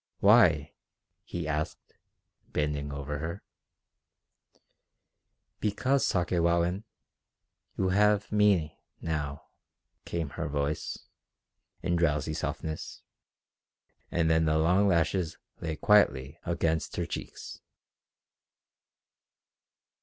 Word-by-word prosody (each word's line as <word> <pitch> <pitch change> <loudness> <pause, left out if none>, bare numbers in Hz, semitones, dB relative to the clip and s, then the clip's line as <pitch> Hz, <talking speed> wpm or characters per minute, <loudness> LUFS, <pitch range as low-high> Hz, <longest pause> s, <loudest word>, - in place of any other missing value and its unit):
"Why?" - - +5 0.5
he 85 -3 -5
asked, 75 0 -3 0.6
bending 75 -1 -1
over 70 +1 -4
her. 80 +3 -5 2.2
"Because, 130 +6 +1
Sakewawin... 85 +2 +1 0.9
you 95 - +1
have 105 +2 +3
me... 100 -7 +3 0.2
now," 75 -3 -3 0.6
came 80 -4 -3
her - - -4
voice, 70 +1 -2 0.9
in 85 -1 +1
drowsy 75 -2 +1
softness; 80 0 -4 1.1
and 85 -1 +1
then 80 0 +3
the 80 0 +2
long 90 +6 +4
lashes 85 -1 +1 0.2
lay 80 -1 -3
quietly 75 -7 +3
against 80 -2 0
her - - -1
cheeks. - - -7
80 Hz, 85 wpm, -29 LUFS, 75-90 Hz, 2.2 s, Why